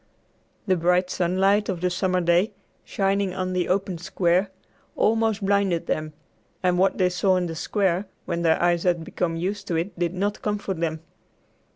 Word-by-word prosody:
The 190 -3 +3
bright 180 +2 +2
sunlight 195 +4 +2
of 185 -3 -2
the 180 0 +1
summer 185 0 0
day, 175 +5 +2 0.3
shining 195 -1 0
on 185 -1 -2
the 180 -1 -1
open 190 -2 0
square, 185 +1 +1 0.5
almost 220 -2 +1
blinded 195 -4 +1
them, 155 0 -2 0.5
and 180 -1 +2
what 190 +1 +3
they 185 - +3
saw 185 +1 +2
in 180 -1 0
the 165 - -4
square, 190 +2 0 0.2
when 170 - -2
their 165 -1 +3
eyes 175 -1 +2
had 175 -2 +1
become 165 0 -2
used 195 +4 -3
to 175 - -1
it, 170 +3 -3
did 175 0 -1
not 200 +3 -1
comfort 200 -4 -2
them. 160 -1 -2
185 Hz, 175 wpm, -24 LUFS, 175-195 Hz, 0.5 s, The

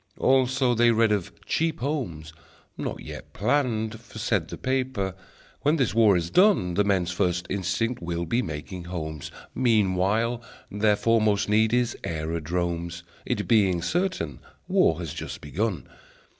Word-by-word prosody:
Also, 130 -1 +3
they 120 0 +4
read 115 -1 +3
of 100 -5 0
Cheap 165 0 0
Homes, 90 - -3 0.4
not - - -4
yet - - -9
planned; 110 -2 0
For, 115 - -13
said 100 -6 0
the - - -7
paper, 130 -7 -1 0.5
"When 150 +2 +3
this 125 - +1
war 110 -4 +5
is 85 -1 -3
done 180 - +4
The 105 - +3
men's 95 -3 +1
first 90 0 0
instinct 100 +5 -1
will 85 0 -2
be 115 +9 +1
making 85 - -6
homes. 80 -4 -5 0.2
Meanwhile 110 0 +2 0.3
their 105 +1 +3
foremost 110 -2 +2
need 110 +1 +3
is 120 -1 +1
aerodromes, 85 +2 -3 0.2
It - - -1
being 95 -6 +3
certain 160 - -1 0.3
war 80 - +3
has 85 -4 -5
just - - -6
begun. 90 - -2
105 Hz, 145 wpm, -26 LUFS, 85-120 Hz, 0.5 s, war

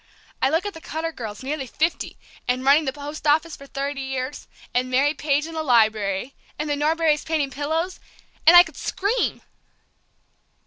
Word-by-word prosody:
I 265 - +4
look 325 +6 +1
at 410 - -3
the 325 - -11
Cutter 320 +1 -3
girls, 220 -6 -7
nearly 275 0 -3
fifty, 320 +7 -1 0.3
and 250 +1 0
running 290 +3 +5
the 265 - 0
post 295 +2 -6
office 310 +2 +3
for 275 - -13
thirty 275 +1 -3
years, 265 +1 -4 0.3
and 250 +1 +1
Mary 275 +4 +3
Page 295 -1 0
in 330 - -8
the 320 - -2
Library, 220 -3 +2 0.2
and 300 - -3
the 295 - 0
Norberrys 305 +1 +2
painting 305 -4 -1
pillows, 320 +7 -2 0.5
and 340 - +10
I 350 - +11
could 320 -5 -13
scream!" 415 +6 -1
290 Hz, 175 wpm, -23 LUFS, 265-320 Hz, 0.5 s, I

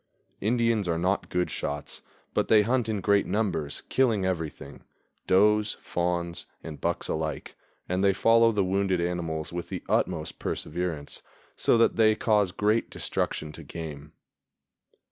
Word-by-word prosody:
Indians 115 -2 +1
are 85 - +1
not 95 +4 0
good 90 0 0
shots, 75 0 -3 0.3
but - - +1
they 105 -1 +6
hunt 120 0 +1
in 105 -3 -1
great 100 +1 +3
numbers, 90 -9 -1
killing 115 -7 +2
everything, 80 -6 -4 0.4
does, 105 +3 +4
fawns 85 -1 -2 0.2
and 75 -4 -8
bucks - - -1
alike, 80 0 -3 0.3
and 90 +2 0
they 100 - +5
follow 115 +3 +5
the 105 -3 +1
wounded 95 -1 +1
animals 85 -2 -2
with 85 0 -4
the - - -5
utmost - - 0
perseverance, 80 -3 -3 0.3
so - - +3
that 115 - +3
they 110 -1 +5
cause 105 -4 +2
great 105 +4 +1
destruction 75 -1 -2
to - - -10
game. 75 -2 -8
95 Hz, 145 wpm, -27 LUFS, 85-105 Hz, 0.4 s, they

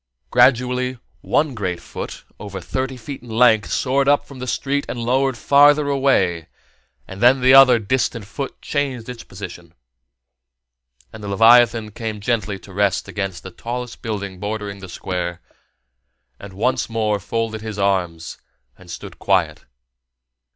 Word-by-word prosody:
Gradually, 125 0 +3 0.2
one 150 -2 +1
great 95 -6 -3
foot, - - -8 0.2
over 100 -2 -7
thirty 130 +8 -3
feet 130 +4 -8
in 120 - -14
length, 110 -2 +3
soared 135 +1 +1
up 145 0 +3
from 135 -2 -12
the 125 - -5
street 140 +4 -1
and - - -4
lowered 130 +2 +1
farther 145 +4 +5
away, 95 - +1 0.6
and 95 +1 -9
then 125 +2 +6
the 130 +1 +5
other 135 -3 +8
distant 115 0 -1
foot 135 +7 -6
changed 135 -5 -2
its 125 -2 -8
position; - - -10 1.4
and 105 - -10
the - - -5
leviathan 115 +1 +5
came 110 0 -5
gently 105 -2 -1
to 95 0 -14
rest 100 0 0
against 95 -3 -4
the 95 - -8
tallest 120 +5 -6
building 100 -4 -5
bordering 105 0 -4
the 95 -1 -10
Square, 90 -1 -4 1.0
and 100 -1 -10
once 120 +7 0
more 110 -2 0
folded 110 +2 -3
his 110 -2 -6
arms 90 -5 -1 0.4
and - - -16
stood - - -9
quiet. - - 0
115 Hz, 145 wpm, -20 LUFS, 100-130 Hz, 1.4 s, other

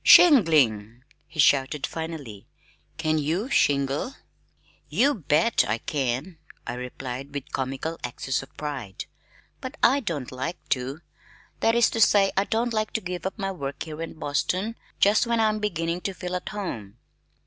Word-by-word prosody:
"Shingling!" 135 - +6 0.2
he 160 - -12
shouted 140 0 +4
finally. 155 -11 -6 0.5
"Can 155 -1 +1
you 170 - -1
shingle?" 140 - +2 0.7
"You 285 +3 +3
bet 165 - +2
I 110 +2 +1
can," 140 +5 -2 0.3
I 120 - -3
replied 125 +2 -6
with 140 - -5
comical 135 +5 -3
access 130 +2 -2
of 135 - -12
pride, 135 -10 -5 0.5
"but 260 +3 -7
I 270 +4 +6
don't 165 - -4
like 130 +8 -4
to. 135 +5 -1 0.6
That 225 - +3
is 235 -1 +4
to 225 - -1
say 200 -2 +5
I 195 - +2
don't 230 +2 0
like 215 -1 -1
to 220 - -1
give 180 -1 -4
up 190 - -6
my 195 -2 -2
work 140 -6 -5
here 155 0 -7
in 165 - -5
Boston 185 +10 -1 0.2
just 210 +4 +4
when 235 -1 +1
I 220 - +4
am 215 0 -1
beginning 170 -4 -1
to 195 0 -3
feel 180 -1 -4
at 180 - -4
home." 115 - -5
160 Hz, 160 wpm, -26 LUFS, 135-205 Hz, 0.7 s, Shingling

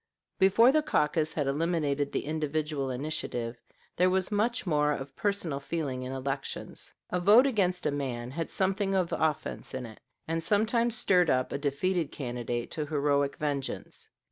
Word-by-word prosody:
Before 210 +6 +6
the 310 +2 +3
caucus 155 - +1
had 145 - 0
eliminated 145 -1 0
the - - -2
individual 150 -2 -2
initiative, 125 -3 -3 0.3
there 180 +1 +4
was 185 +2 0
much 225 +4 0
more 150 -4 +2
of 135 -1 -6
personal 195 -9 -1
feeling 140 -3 -3
in 130 0 -5
elections. 135 +1 -5 0.2
A 180 - +1
vote 210 +8 +7
against 185 -8 +1
a - - +2
man 125 -4 -3
had 165 +3 -3
something 195 +1 0
of 180 -3 +1
offense 155 -4 -2
in 130 -1 -4
it, 110 -2 -11 0.3
and 165 +1 -1
sometimes 225 +5 +2
stirred 180 -5 +3
up 130 0 +1
a - - -2
defeated 155 +4 0
candidate 120 -2 -4
to 150 -2 -3
heroic 145 -1 +1
vengeance. 145 -3 -4
155 Hz, 160 wpm, -29 LUFS, 140-185 Hz, 0.3 s, vote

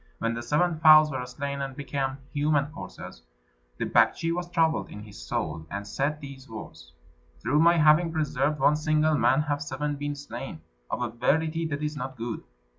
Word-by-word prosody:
When 115 0 -1
the 120 - -4
seven 155 +6 +1
fowls 155 -1 +8
were 130 -2 -3
slain 140 +2 -4
and 135 -1 -4
become 135 -1 -3 0.2
human 145 0 +1
corses, 95 - -9 0.6
the - - -1
Baktschi 165 0 +3
was 175 0 -4
troubled 165 -2 +1
in 105 - -9
his 105 -2 -11
soul, 80 0 -3
and 100 +1 -5
said 145 +8 -1
these 140 -2 -10
words, 110 - -10 0.5
"Through 145 +4 +1
my 170 +2 +5
having 155 +2 +5
preserved 150 -2 0
one 145 +2 +4
single 155 0 +2
man 150 0 +3
have 145 -1 -2
seven 145 +1 -3
been 145 0 -3
slain. 140 - -7 0.3
Of 125 - -2
a 120 - -1
verity 160 +7 0
this 145 -1 -3
is 150 0 -2
not 130 -1 -5
good." 115 0 -4
145 Hz, 185 wpm, -27 LUFS, 130-155 Hz, 0.6 s, fowls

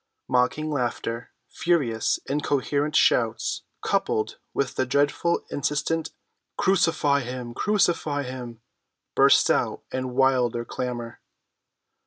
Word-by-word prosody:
Mocking 125 +5 +1
laughter, 120 -3 -2 0.2
furious 140 -10 +1
incoherent 145 +1 0
shouts, - - +2 0.2
coupled 435 -1 0
with 140 -2 -1
the 130 - -1
dreadful, 145 +5 +1
insistent, 150 +3 -1 0.5
"Crucify 165 -6 +3
him! 125 -2 -6
Crucify 170 - +1
him!" 125 -3 -7 0.5
burst - - +5
out - - 0
in 130 -1 -3
wilder 125 -3 +2
clamor. 120 -1 -5
135 Hz, 95 wpm, -25 LUFS, 125-155 Hz, 0.5 s, burst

